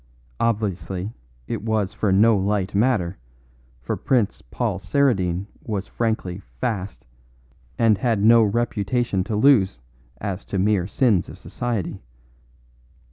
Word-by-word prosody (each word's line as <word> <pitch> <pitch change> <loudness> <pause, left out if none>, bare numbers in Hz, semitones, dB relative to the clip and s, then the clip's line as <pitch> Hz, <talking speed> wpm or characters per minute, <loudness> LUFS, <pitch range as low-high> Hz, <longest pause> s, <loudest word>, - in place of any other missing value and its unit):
Obviously 100 -3 -1 0.3
it - - -4
was 110 -3 -1
for 105 - 0
no 110 +4 +5
light 100 0 0
matter, 100 -5 +1 0.6
for - - -2
Prince 120 -7 0
Paul - - -3
Saradine 95 -5 +1 0.2
was 105 -3 -3
frankly 110 -6 -2
'fast,' 100 -1 -5 0.7
and 110 -4 +3
had 110 -3 +1
no 115 +1 +7
reputation 110 -1 0
to 110 - -2
lose 105 - +4 0.4
as 100 -2 -4
to 100 - -3
the 95 - +2
mere 100 -4 +2
sins 105 -5 +2
of - - -10
society. 110 -6 -4
105 Hz, 125 wpm, -23 LUFS, 95-115 Hz, 0.7 s, no